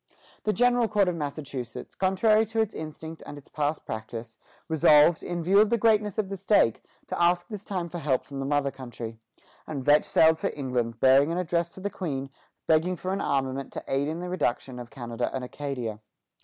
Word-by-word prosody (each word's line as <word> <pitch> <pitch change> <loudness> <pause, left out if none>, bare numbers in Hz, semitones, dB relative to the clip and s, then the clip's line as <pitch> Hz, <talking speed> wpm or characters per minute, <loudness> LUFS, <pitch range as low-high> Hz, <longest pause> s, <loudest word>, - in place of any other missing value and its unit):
The 215 - +3
General 245 +1 +3
Court 205 -3 +2
of 175 - -2
Massachusetts, 140 -6 -6
contrary 215 +3 +3
to 225 +1 -2
its 220 -2 +1
instinct 160 +1 -7
and 145 - -9
its 145 - -13
past 150 +1 -2
practice, 115 +1 -7 0.3
resolved, 155 0 +5
in 175 -1 -3
view 195 +4 +5
of 215 0 +5
the 235 - +2
greatness 210 -3 +2
of 215 -3 0
the 195 - -4
stake, 195 - +2 0.2
to - - -3
ask 175 0 +3
this 210 -3 -7
time 185 -4 -3
for 175 +1 -6
help 135 -4 0
from 140 -1 -7
the 135 - -2
mother 145 -1 +1
country, 120 -4 -8 0.5
and 140 -4 -5
Vetch 150 +1 +5
sailed 160 0 +4
for - - 0
England, 125 -5 -2
bearing 135 +5 +5
an 170 - -1
address 170 -1 -1
to 190 - -10
the 200 +1 -3
Queen, 140 -7 -4 0.3
begging 165 +3 +2
for 185 +2 -3
an 195 - -2
armament 135 -1 -1
to - - -5
aid 135 +1 0
in 160 +3 -3
the 180 - -4
reduction 130 -7 -2
of 120 -1 -8
Canada 120 -2 -4
and 130 - -3
Acadia. 125 -5 -4
155 Hz, 205 wpm, -27 LUFS, 135-185 Hz, 0.5 s, resolved